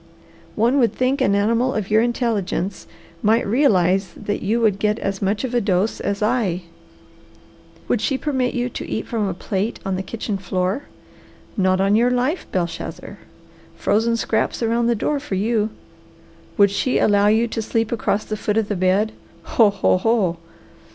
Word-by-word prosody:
One 240 +6 +2
would 235 -3 +3
think 255 +2 0
an 200 - +3
animal 230 +5 +1
of 210 -2 -3
your 215 +1 +5
intelligence 220 -6 -1 0.3
might 225 +3 +3
realize 195 - +2
that 205 -1 -3
you 220 +4 0
would 210 -4 +2
get 210 0 +1
as 195 0 -3
much 205 +3 0
of 255 -2 -3
a 240 - +2
dose 195 +1 0
as 200 +1 -2
I. 210 -6 0 1.2
Would 230 - +1
she 270 +4 0
permit 260 -4 -1
you 245 0 0
to 250 - -7
eat 220 - -3
from 220 -3 -1
a 185 - -3
plate 195 +4 -3
on 190 -1 -1
the - - -2
kitchen 210 0 -4
floor? 185 +7 -2 0.7
Not 185 -3 +2
on 195 +2 +3
your 235 +3 +4
life, 250 +8 -1
Belshazzar! 170 -2 -4 0.6
Frozen 230 +2 +1
scraps 225 +1 -1
around 230 +1 +1
the 235 - +2
door 290 +6 -1
for 275 -9 -4
you! 215 +2 +1 0.9
Would 200 -2 +5
she 255 +6 0
allow 205 -1 +3
you 220 +3 +3
to 225 - -3
sleep 225 0 -1
across 215 -2 0
the 215 - -3
foot 210 0 -1
of 220 -2 0
the 205 - 0
bed? 190 +4 +2 0.3
Ho, 225 -3 +4
ho, 195 -2 +1
ho! 200 -5 +1
215 Hz, 175 wpm, -21 LUFS, 195-235 Hz, 1.2 s, your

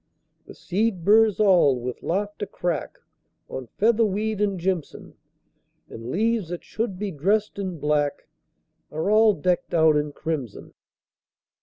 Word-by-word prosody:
The - - -11
seed 195 -2 -1
burrs 215 0 +5
all 180 -11 +4
with 125 +1 -6
laughter 205 +3 -2
crack 175 -2 -3 0.5
On 130 -2 -6
featherweed 215 -1 +1
and 200 -3 0
jimson; 175 -3 -3 0.8
And 115 +1 -8
leaves 220 - 0
that 175 -1 -6
should 220 -4 -4
be 200 0 -3
dressed 200 +7 0
in 185 -3 -4
black 150 -1 -1 0.6
Are 160 +6 -1
all 215 -1 +5
decked 175 +3 -1
out 160 -2 +5
in 150 0 0
crimson. 145 -8 -5
185 Hz, 130 wpm, -24 LUFS, 155-210 Hz, 0.8 s, burrs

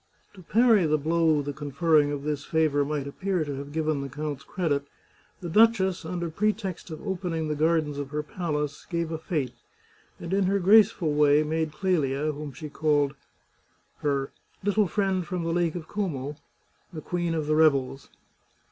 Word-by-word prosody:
To 190 - -13
parry 220 -1 +4
the 155 0 +2
blow 160 0 +2
the 145 0 -4
conferring 145 +1 +2
of 145 -1 -4
this 150 -1 -2
favour 155 -3 +2
might 145 -1 -2
appear 180 +3 -2
to 145 -1 -4
have 140 +1 -7
given 155 -2 -1
the 140 - -5
count's 145 0 -5
credit, 145 -6 -1 0.5
the 175 - -5
duchess, 190 -1 +3
under 170 0 -3
pretext 205 -1 -2
of 160 +5 -8
opening 175 -4 -2
the 150 - -1
gardens 155 -2 +1
of 140 -1 -4
her 150 +1 -3
palace, 150 -3 -3
gave 170 -2 -2
a 160 - -3
fete, 150 -7 -2 0.7
and 170 - -5
in 195 0 +2
her 195 +2 +2
graceful 195 -4 +4
way 150 0 +4
made 160 0 -1
Clelia, 155 -4 0
whom 150 0 -7
she 145 +4 -8
called 145 -2 +1 0.9
her 140 -2 -1 0.2
" - - -36
little 205 0 +2
friend 190 -2 0
from 180 -3 -3
the 165 0 -1
Lake 170 -1 0
of 165 -3 -6
Como," 150 -9 -3 0.6
the 160 -3 -7
queen 175 -1 -2
of 155 -2 -1
the 155 +1 +1
revels. 140 -4 +2
155 Hz, 175 wpm, -26 LUFS, 145-180 Hz, 0.9 s, parry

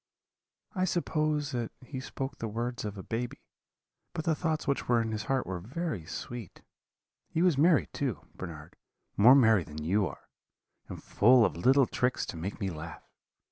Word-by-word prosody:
I 185 -2 +1
suppose 155 -4 0
that 120 -3 -3
he 130 0 -6
spoke 135 +1 -5
the 115 - -3
words 120 +3 -3
of 105 -1 -5
a 95 - -7
baby; 120 +4 -3 0.8
but 160 - -4
the 165 - +3
thoughts 160 0 -1
which 140 - 0
were 120 -1 +4
in 115 -1 -1
his 110 0 -3
heart 135 0 0
were 95 -1 -4
very 130 - -4
sweet. 115 +3 -7 0.7
He 165 - +1
was 180 -4 +4
merry, 160 +3 +4
too, 135 -7 -3
Bernard, 80 -5 -9 0.4
more 120 +6 +8
merry 110 -8 +5
than 75 -1 -8
you 95 +4 +2
are, 75 - -11 0.6
and - - -8
full 120 +2 +5
of - - -1
little 130 +10 +4
tricks 125 +1 0
to - - -6
make 90 +7 -5
me 95 -3 -2
laugh. 80 -1 -8
120 Hz, 180 wpm, -30 LUFS, 100-140 Hz, 0.8 s, more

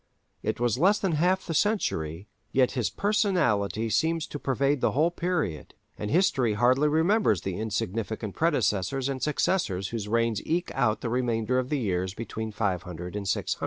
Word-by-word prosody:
It - - -2
was 120 0 +1
less 195 +6 +4
than 195 -3 -1
half 180 +5 +1
the 165 - -3
century, 100 - 0 0.2
yet 130 -1 +3
his 125 -5 -1
personality 165 - +1
seems 165 +3 +1
to 145 - -7
pervade 140 +1 0
the - - +2
whole 160 +5 +3
period, 170 - -2 0.2
and 105 - -4
history 135 - +2
hardly 130 +6 +3
remembers 160 - +2
the 95 -1 -4
insignificant 110 0 -3
predecessors 130 - +1
and 135 -2 -3
successors 130 - 0
whose 110 -3 -4
reigns 115 -1 +1
eke 170 +2 -1
out 115 -5 +1
the 120 - -2
remainder 120 0 +1
of 130 0 -3
the 150 - 0
years 95 -5 -1
between 110 -1 -5
500 90 -4 -3
and 100 -1 -4
600. - - -1
120 Hz, 165 wpm, -27 LUFS, 105-160 Hz, 0.2 s, less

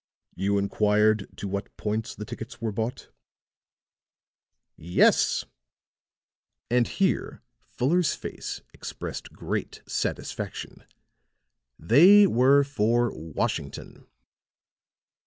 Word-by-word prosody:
"You 100 +2 0
inquired 105 +1 +2
to 100 - -5
what 100 +1 -5
points 110 +2 -3
the 105 - -7
tickets 115 +4 -8
were 115 -2 -2
bought?" 110 +4 -4 1.6
"Yes," 85 +3 +2 1.3
and 120 -1 +3
here 195 -2 -1 0.2
Fuller's 165 +7 +1
face - - -6
expressed - - -7
great - - -5
satisfaction. - - -4 0.9
"They 185 - +7
were 140 -3 +4
for 120 -3 +1
Washington." 80 -2 -5
115 Hz, 85 wpm, -26 LUFS, 105-135 Hz, 1.6 s, They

